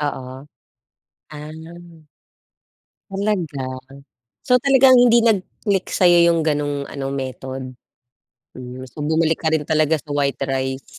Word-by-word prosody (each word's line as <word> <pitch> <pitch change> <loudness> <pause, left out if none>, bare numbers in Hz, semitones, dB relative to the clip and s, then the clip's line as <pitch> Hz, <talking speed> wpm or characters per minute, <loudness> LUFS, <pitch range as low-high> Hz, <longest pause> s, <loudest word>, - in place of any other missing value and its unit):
Oo. 130 -2 -5 0.8
Ah. 160 +2 -11 1.1
Talaga? 170 -11 -3 0.6
So 250 0 +3
talagang 265 0 +5
hindi 240 -1 +5
nag-click 200 -2 0
sa'yo 175 -2 +5
yung 170 -1 +2
gano'ng 145 -2 -1
ano, 135 -1 -5
method? 130 0 -5 0.9
Hmm, 125 0 -9
so - - -18
bumalik 160 +2 +1
ka - - -6
rin 155 - 0
talaga 155 +1 +1
sa 150 - -17
white 140 -2 -1
rice. 130 0 -4
155 Hz, 115 wpm, -20 LUFS, 135-175 Hz, 1.1 s, talagang